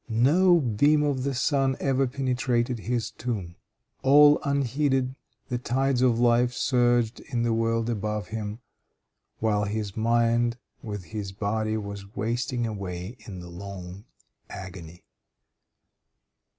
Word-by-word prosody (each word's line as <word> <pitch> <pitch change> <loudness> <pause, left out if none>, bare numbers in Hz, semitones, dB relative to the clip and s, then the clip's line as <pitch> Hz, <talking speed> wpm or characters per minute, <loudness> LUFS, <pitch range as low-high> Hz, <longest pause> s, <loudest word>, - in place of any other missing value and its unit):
No 165 +11 +4
beam 145 +4 +3
of 140 -3 0
the 135 0 -1
sun 135 0 +1
ever 135 -1 +1
penetrated 125 -2 0
his 120 +1 -2
tomb. 100 -8 -4 0.5
All 145 +2 +7
unheeded 135 -1 +1 0.4
the 125 -1 -1
tides 130 +1 0
of 120 -3 +3
life 120 0 +3
surged 120 -3 +2
in 120 -3 -3
the 120 -1 +1
world 115 0 0
above 105 -2 -2
him, 110 +1 -5 0.8
while 105 -2 +1
his 105 -1 -3
mind 115 +1 +2 0.2
with 105 -4 -6
his 105 0 -6
body 110 +2 -1
was 100 -1 -7
wasting 120 +2 -1
away 100 -1 -5
in 95 -4 -7
the 90 - -10
long 95 +1 -8 0.4
agony. 90 -2 -9
115 Hz, 125 wpm, -26 LUFS, 105-130 Hz, 0.8 s, All